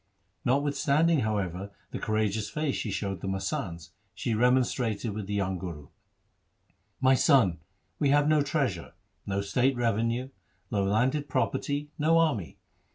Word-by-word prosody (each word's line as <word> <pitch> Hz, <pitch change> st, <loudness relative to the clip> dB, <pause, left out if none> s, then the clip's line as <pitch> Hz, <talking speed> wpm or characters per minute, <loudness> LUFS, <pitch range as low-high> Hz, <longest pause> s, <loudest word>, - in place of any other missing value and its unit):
Notwithstanding, 145 Hz, +4 st, +2 dB
however, 100 Hz, -4 st, -2 dB, 0.2 s
the -, -, -4 dB
courageous 110 Hz, -1 st, 0 dB
face 150 Hz, -3 st, -1 dB
she 110 Hz, -, -3 dB
showed 95 Hz, -2 st, -3 dB
the -, -, -4 dB
masands, 95 Hz, -, -3 dB, 0.2 s
she 120 Hz, -, -2 dB
remonstrated 120 Hz, -2 st, +1 dB
with 105 Hz, -2 st, -5 dB
the 105 Hz, -, -2 dB
young 95 Hz, -2 st, -1 dB
Guru. 80 Hz, -6 st, -7 dB, 0.6 s
' -, -, -43 dB
My -, -, +7 dB
son, 125 Hz, -, +4 dB, 0.4 s
we 145 Hz, -, +2 dB
have 145 Hz, +1 st, +4 dB
no 155 Hz, -1 st, +4 dB
treasure, 140 Hz, -, -1 dB, 0.3 s
no 100 Hz, 0 st, 0 dB
state 125 Hz, +7 st, +1 dB
revenue, 115 Hz, +2 st, 0 dB, 0.4 s
no 100 Hz, -1 st, +1 dB
landed 130 Hz, +9 st, +1 dB
property, 145 Hz, +3 st, -1 dB
no 160 Hz, +2 st, +4 dB
army. 150 Hz, -, +1 dB
115 Hz, 140 wpm, -28 LUFS, 100-140 Hz, 0.6 s, My